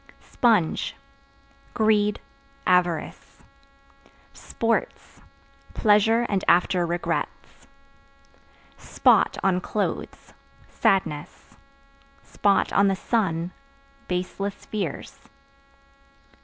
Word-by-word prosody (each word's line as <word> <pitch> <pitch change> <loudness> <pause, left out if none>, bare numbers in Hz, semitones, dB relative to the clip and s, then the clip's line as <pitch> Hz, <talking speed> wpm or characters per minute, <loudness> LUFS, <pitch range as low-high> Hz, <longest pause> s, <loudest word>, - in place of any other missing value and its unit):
Sponge 220 -9 +1 0.8
Greed, 210 -2 +2 0.5
avarice. 180 -3 -1 0.9
Sports 230 0 -3 0.5
Pleasure 225 +2 +3
and 195 -2 -1
after 175 0 +3
regrets. 175 +1 -4 1.1
Spot - - +2
(On 185 -1 +2
clothes) 210 +2 -4 0.3
sadness; 165 -4 -2 0.9
(on 200 0 +3
the 195 - +1
sun) 180 -6 -1 0.6
baseless 185 +2 -4
fears. 195 -9 -5
195 Hz, 60 wpm, -24 LUFS, 175-210 Hz, 1.1 s, Pleasure